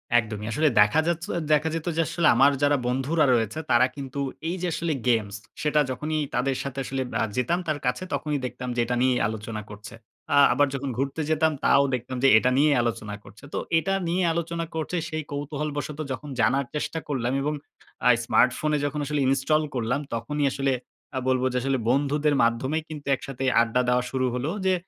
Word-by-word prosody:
একদমই। 110 -3 +1
আসলে 155 +6 +2
দেখা 105 +10 +4
যাচ্ছ 170 0 -1 0.3
দেখা 150 +1 +3
যেত 165 0 -4
যে - - +4
আসলে, 170 - +1
আমার 140 +1 +6
যারা 145 0 +4
বন্ধুরা 135 +5 +1
রয়েছে; 115 +4 0
তারা 120 +2 +6
কিন্তু 140 -1 -6 0.3
এই 170 - -1
যে 180 - 0
আসলে 165 -1 -1
গেমস, 110 -4 +1 0.3
সেটা 150 0 +2
যখনই 155 +4 -2 0.2
তাদের 130 +2 +1
সাথে 135 0 -5
আসলে 135 0 -3 0.2
আ - - +3
যেতাম 125 +8 +1
তার 155 -2 -1
কাছে 125 +8 0
তখনই 150 -2 -1
দেখতাম 125 0 -6
যে - - -2
এটা 125 +1 -1
নিয়েই 125 -1 +3
আলোচনা 110 0 -5
করছে। 105 +1 -10 0.4
আ - - +5 0.2
আবার 145 0 +3
যখন 135 0 -3
ঘুরতে 140 +4 -2
যেতাম, 160 0 +3
তাও 140 - +5
দেখতাম 125 +1 -5
যে - - +7
এটা 125 - +3
নিয়েই 145 0 +4
আলোচনা 115 -3 -3
করছে। 105 - -16
তো - - -1 0.2
এটা 195 +4 -1
নিয়ে 180 +2 +1
আলোচনা 170 0 -2
করছে, 160 +2 -3
সেই 155 -1 -3
কৌতূহল 145 +1 -3
বশত 150 +1 -4
যখন 145 +3 -5
জানার 130 +5 +2
চেষ্টা 155 +2 -2
করলাম 130 -4 -1
এবং 150 +2 -1 0.5
আ - - +7 0.2
স্মার্টফোনে 150 +6 +2
যখন 145 +1 -2
আসলে 150 +1 -1
ইনস্টল 135 +4 +2
করলাম 125 +2 0
তখনই 145 +5 -1
আসলে 135 -1 0 0.4
আ - - -1
বলবো 130 0 +2
যে - - 0
আসলে 135 0 +1
বন্ধুদের 145 +3 +2
মাধ্যমেই 130 +7 0
কিন্তু 150 -3 -8
একসাথে 135 0 -7 0.2
আড্ডা 120 +2 +1
দেওয়া 125 0 +2
শুরু 130 -1 0
হলো। 125 +4 -2 0.2
যে, 190 - +4
140 Hz, 195 wpm, -25 LUFS, 125-150 Hz, 0.5 s, যে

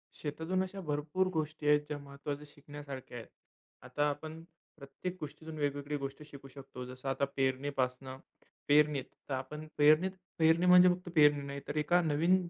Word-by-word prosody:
शेतातून 165 +5 -2
अशा 195 +1 -6
भरपूर 150 +3 -1
गोष्टी 155 -1 -2
आहेत 150 0 +5
ज्या 150 -1 -4
महत्वाच्या 140 +1 -6
शिकण्यासारख्या 145 -3 -9
आहेत. 115 - -9 0.5
आता 145 0 0
आपण 155 +3 -6 0.3
प्रत्येक 155 +5 -6
गोष्टीतून 155 +1 -8
वेगवेगळी 145 0 -2
गोष्टी 140 +2 -6
शिकू 140 -2 -12
शकतो. 135 -2 -9
जसं 130 +2 -6
आता 135 +1 +1
पेरणीपासनं 130 -1 -1 0.5
पेरणीत 145 -2 +4 0.3
तर - - -1
आपण 135 +4 -5
पेरणीत 155 +5 +5 0.3
पेरणी 160 +2 +4
म्हणजे 180 0 +8
फक्त 180 0 -2
पेरणी 150 -2 +6
नाही 140 0 -5
तर 145 - -4
एका 175 +4 +3
नवीन 165 +3 +3
145 Hz, 155 wpm, -32 LUFS, 140-160 Hz, 0.5 s, म्हणजे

